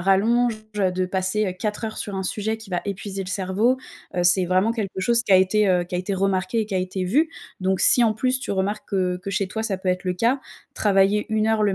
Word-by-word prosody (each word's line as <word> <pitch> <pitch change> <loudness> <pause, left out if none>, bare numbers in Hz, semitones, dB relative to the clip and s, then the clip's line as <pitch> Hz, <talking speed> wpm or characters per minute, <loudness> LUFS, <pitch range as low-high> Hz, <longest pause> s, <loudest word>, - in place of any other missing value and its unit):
rallonge, 220 +5 +2 0.2
heu, 190 -2 +2
de 185 0 -1
passer, 190 +3 -1
heu, 185 - -2
4 210 +3 -3
heures 220 -1 -5
sur 205 - -5
un 190 - -2
sujet 215 +3 -2
qui 220 -3 -13
va 175 -1 -1
épuiser 195 0 -4
le 185 - -8
cerveau, 200 +6 0 0.4
heu, 175 - +1
c'est 175 +1 +4
vraiment 185 +5 +2
quelque 210 -5 -4
chose 235 +4 +3
qui 205 - 0
a - - +9
été, 195 +3 +3
heu, 180 -1 +2
qui 175 - -8
a - - 0
été 185 +2 -2
remarqué 190 +2 0
et 215 - -2
qui 205 - -5
a - - +2
été 185 0 -3
vu, 295 - +2 0.3
donc, 190 0 0
si, 250 -6 +7
en 220 - +3
plus, 255 +4 0
tu - - -5
remarques 200 +2 -2
que 185 -3 0
que 195 - -5
chez 195 +1 -1
toi, 220 +3 -4
ça 200 -4 -2
peut 185 - -4
être 180 0 -1
le 180 -1 -1
cas, 235 +8 +1 0.3
travailler 200 0 +2
1 215 0 +1
heure 220 -1 +2
le 200 -2 +2
195 Hz, 265 wpm, -23 LUFS, 185-220 Hz, 0.4 s, a